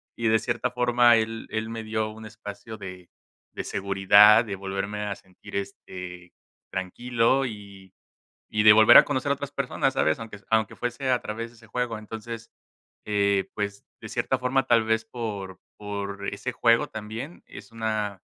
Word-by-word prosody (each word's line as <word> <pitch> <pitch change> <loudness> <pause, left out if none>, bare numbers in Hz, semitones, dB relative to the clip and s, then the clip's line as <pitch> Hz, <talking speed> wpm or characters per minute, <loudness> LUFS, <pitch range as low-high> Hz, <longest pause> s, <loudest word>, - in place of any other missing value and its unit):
Y 115 - -1
de 110 0 +4
cierta 120 +2 -2
forma 120 -1 +4
él 115 0 -2
él 110 +1 -2
me 115 0 -5
dio 110 0 -2
un 110 0 -11
espacio 110 +1 -9
de 90 -3 -9 0.4
de - - -4
seguridad, 100 +3 +6
de 100 -3 -4
volverme 100 +2 -4
a 100 -1 -3
sentir, 95 -1 -14
este, 90 -2 -7 0.4
tranquilo, 120 +7 +1
y 100 -5 -9 0.6
y 105 0 +1
de 105 - +10
volver 110 0 +7
a - - +10
conocer 140 0 -1
a - - +5
otras 140 0 -6
personas, 135 -1 -1
¿sabes? 80 -11 +2
Aunque 110 -3 -8
aunque 110 -2 +1
fuese 125 +2 -3
a 125 -1 +2
través 115 +2 -5
de - - -20
ese 115 0 -17
juego, 120 0 -2
entonces, 110 +1 -8 0.6
eh, 100 -1 +2
pues, 100 -1 -4 0.2
de - - -8
cierta 130 - 0
forma 130 +1 +1
tal 115 -2 +4
vez 110 0 +1
por 105 -6 -6 0.2
por 100 -1 -5
ese 125 - -4
juego 115 +4 +3
también 110 +9 -7
es - - -12
una 110 -4 -2
110 Hz, 170 wpm, -26 LUFS, 100-120 Hz, 0.6 s, de